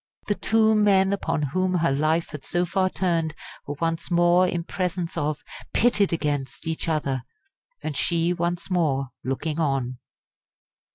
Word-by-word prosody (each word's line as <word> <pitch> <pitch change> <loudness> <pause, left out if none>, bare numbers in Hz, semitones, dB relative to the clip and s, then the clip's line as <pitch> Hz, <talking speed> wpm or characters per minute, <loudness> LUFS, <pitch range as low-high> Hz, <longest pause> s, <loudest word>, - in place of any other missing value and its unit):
The 210 - +1
two 220 +1 +3
men 200 -2 +4
upon 160 -6 -1
whom 185 +6 0
her 170 -3 +2
life 155 +4 +1
had 150 -3 -7
so 175 +4 0
far 185 +2 +1
turned 165 -5 0 0.3
were 145 - -3
once 165 0 -1
more 175 +1 +4
in 175 -1 -2
presence 180 -1 -3
of, 150 0 -2 0.3
pitted 210 -4 +3
against, 145 -5 -2
each 160 0 -2
other 140 -5 0 0.6
and 155 - -3
she, 170 +4 +1
once 175 +1 -2
more, 140 -7 +1
looking 150 +4 -2
on! 135 -5 0
165 Hz, 150 wpm, -25 LUFS, 150-185 Hz, 0.6 s, men